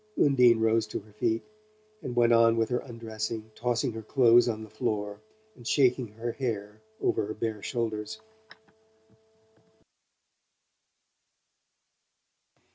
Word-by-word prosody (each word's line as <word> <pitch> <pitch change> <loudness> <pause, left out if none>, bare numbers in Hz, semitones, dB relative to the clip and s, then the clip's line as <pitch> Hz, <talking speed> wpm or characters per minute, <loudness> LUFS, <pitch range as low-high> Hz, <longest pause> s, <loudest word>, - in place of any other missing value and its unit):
Undine 125 -5 +5
rose 110 0 +2
to - - -4
her 105 +1 -20
feet 110 +1 0 0.6
and 125 -6 -5
went 120 -1 +4
on 115 0 +5
with 115 -1 +1
her 125 - 0
undressing, 110 -2 -6
tossing 120 +2 -1
her 110 0 -7
clothes 120 +1 +5
on 110 -1 -3
the 110 - -11
floor 105 -1 -3 0.3
and 120 -1 -11
shaking 125 -3 +3
her 115 +3 -5
hair 110 -5 -4 0.2
over 105 - 0
her 110 - -5
bare 110 -1 -3
shoulders. 110 -1 -3
115 Hz, 120 wpm, -28 LUFS, 110-120 Hz, 0.6 s, Undine